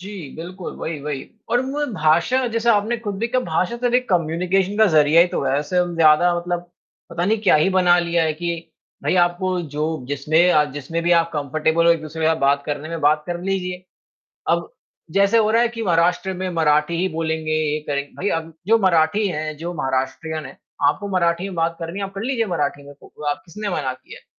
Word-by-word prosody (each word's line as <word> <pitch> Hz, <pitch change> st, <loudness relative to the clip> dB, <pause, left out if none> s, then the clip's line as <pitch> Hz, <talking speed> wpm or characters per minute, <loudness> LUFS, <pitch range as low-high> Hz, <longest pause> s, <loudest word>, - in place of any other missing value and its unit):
जी, 195 Hz, +3 st, -8 dB, 0.3 s
बिल्कुल, 180 Hz, +2 st, -7 dB
वही, 160 Hz, -2 st, -4 dB
वही 145 Hz, -2 st, -4 dB, 0.3 s
और 240 Hz, +1 st, +3 dB
म 290 Hz, +3 st, -2 dB
भाषा 170 Hz, +11 st, +2 dB
जैसे 230 Hz, +1 st, -1 dB
आपने 215 Hz, +2 st, +2 dB
खुद 205 Hz, -4 st, -4 dB
भी 230 Hz, -, 0 dB
कहा 255 Hz, +2 st, +1 dB
भाषा 180 Hz, +8 st, -1 dB
तो 245 Hz, -, -2 dB
एक 250 Hz, 0 st, +2 dB
कम्युनिकेशन 180 Hz, +3 st, 0 dB
का 220 Hz, -, +6 dB
ज़रिया 155 Hz, -2 st, +5 dB
ही 175 Hz, -, +6 dB
तो -, -, -2 dB
है, 135 Hz, +1 st, +1 dB
ऐसे 165 Hz, +5 st, -1 dB
हम 175 Hz, -1 st, 0 dB
ज़्यादा 165 Hz, +2 st, +5 dB
मतलब, 175 Hz, 0 st, -2 dB, 0.5 s
पता 170 Hz, +1 st, -2 dB
नहीं 220 Hz, +4 st, +2 dB
क्या -, -, +5 dB
ही 155 Hz, +5 st, +3 dB
बना 180 Hz, -2 st, +4 dB
लिया 170 Hz, -1 st, +1 dB
है 160 Hz, -, +1 dB
कि 170 Hz, 0 st, -4 dB, 0.3 s
भाई -, -, +1 dB
आपको 180 Hz, +1 st, -2 dB
जो 155 Hz, -2 st, -3 dB
जिसमें 155 Hz, +5 st, +2 dB
अ, 150 Hz, -3 st, +4 dB
जिसमें 155 Hz, +4 st, -4 dB
भी 175 Hz, +1 st, +2 dB
आप 170 Hz, 0 st, +3 dB
कम्फर्टेबल 155 Hz, +3 st, 0 dB
हो 170 Hz, -, +7 dB
एक-दूसरे 160 Hz, 0 st, -4 dB
का 160 Hz, -, +4 dB
बात 140 Hz, -1 st, +2 dB
करने 145 Hz, +1 st, -4 dB
में 165 Hz, 0 st, -5 dB
बात 150 Hz, +1 st, +3 dB
कर 175 Hz, 0 st, -4 dB
लीजिए। 185 Hz, -1 st, -3 dB, 0.7 s
अब, -, -, 0 dB, 0.4 s
जैसे 200 Hz, +5 st, +3 dB
हो 215 Hz, -1 st, +3 dB
रहा 230 Hz, -, +4 dB
है 240 Hz, -, +3 dB
कि 230 Hz, -1 st, -6 dB
महाराष्ट्र 175 Hz, +1 st, +1 dB
में 185 Hz, 0 st, -3 dB
मराठी 160 Hz, -1 st, +1 dB
ही 190 Hz, -, +2 dB
बोलेंगे 160 Hz, -1 st, -2 dB
ये 155 Hz, -1 st, 0 dB
करेंगे 140 Hz, 0 st, -2 dB
भाई 200 Hz, -, -2 dB
अब 165 Hz, 0 st, -12 dB
जो 225 Hz, +2 st, +5 dB
मराठी 185 Hz, +2 st, +3 dB
हैं 155 Hz, -3 st, -3 dB
जो 170 Hz, +3 st, -5 dB
महाराष्ट्रियन 135 Hz, +2 st, -2 dB
हैं, 135 Hz, -, -11 dB, 0.3 s
आपको 200 Hz, +8 st, 0 dB
मराठी 170 Hz, 0 st, +1 dB
में 185 Hz, -, -8 dB
बात 165 Hz, 0 st, 0 dB
करनी 170 Hz, +4 st, -5 dB
है 200 Hz, -, -2 dB
आप 195 Hz, -, -10 dB
कर 195 Hz, -, -5 dB
लीजिए 245 Hz, -3 st, 0 dB
मराठी 145 Hz, -6 st, -2 dB
में 145 Hz, -, -11 dB
को 150 Hz, -, -14 dB
आप 145 Hz, 0 st, -3 dB
किसने 205 Hz, +5 st, -5 dB
मना 140 Hz, -8 st, -2 dB
किया 130 Hz, 0 st, -14 dB
है? -, -, -31 dB
170 Hz, 220 wpm, -21 LUFS, 155-190 Hz, 0.7 s, हो